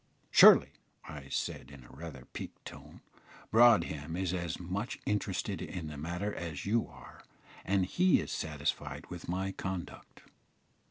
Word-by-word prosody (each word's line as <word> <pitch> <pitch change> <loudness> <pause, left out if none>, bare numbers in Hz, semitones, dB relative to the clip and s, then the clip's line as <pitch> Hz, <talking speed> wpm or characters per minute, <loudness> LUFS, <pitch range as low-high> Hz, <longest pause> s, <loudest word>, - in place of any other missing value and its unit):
"Surely," - - +8 0.4
I 70 -3 -9
said, 65 - -3
in 70 -3 -13
rather 70 +1 -9
a - - -16
piqued - - -9
tone, - - -11 0.5
"Broadhem 85 -10 +4
is 95 -1 -1
as 85 -3 -3
much 95 +6 -4
interested 105 -1 -2
in 85 -4 -5
the 75 - -7
matter 85 +8 -3
as 80 -4 -5
you 115 +3 +1
are, 60 0 -14 0.4
and 95 -1 +1
he 180 - +3
is - - -5
satisfied 75 -2 -3
with 85 -1 -7
my 95 +2 -1
conduct." 95 -2 -7
85 Hz, 145 wpm, -32 LUFS, 75-95 Hz, 0.5 s, Surely